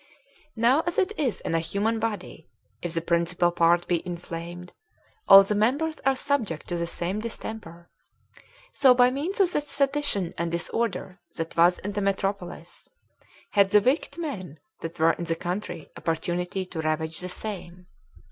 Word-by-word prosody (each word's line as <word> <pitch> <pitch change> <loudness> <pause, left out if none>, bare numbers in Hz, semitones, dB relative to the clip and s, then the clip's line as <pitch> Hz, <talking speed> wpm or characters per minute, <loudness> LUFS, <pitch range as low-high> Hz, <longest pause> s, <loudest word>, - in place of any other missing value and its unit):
Now 245 +6 +4
as 345 - -1
it 385 +1 +2
is 265 - -1
in - - -3
a 165 - +3
human 205 +7 -1
body, 210 -7 -4 0.3
if 175 -1 -3
the 165 - 0
principal 170 +1 +1
part 170 0 +3
be 175 -2 +1
inflamed, 175 0 -7 0.5
all 195 0 +11
the 195 - -1
members 280 +10 +1
are 270 0 +2
subject 250 - -1
to 175 - -1
the 170 0 -2
same 175 +4 -2
distemper; 215 -6 -7 0.9
so, 260 -3 +6
by 245 0 +5
means 315 +10 -3
of 375 -3 +4
the - - +1
sedition 280 - 0
and 170 0 0
disorder 185 +2 -2 0.2
that 165 0 -4
was 175 +2 +5
in 205 - -5
the 205 0 -2
metropolis,. 195 -1 -3 0.6
had 200 -2 +4
the 210 - +6
wicked 275 +6 0
men 185 - -5 0.2
that 165 +1 -6
were 165 +1 +5
in 170 - -5
the 165 0 -1
country 175 -2 -5
opportunity 175 +3 -2
to 175 -3 -5
ravage 160 +1 -2
the 180 - -5
same. 180 -3 -6
185 Hz, 165 wpm, -26 LUFS, 170-230 Hz, 0.9 s, all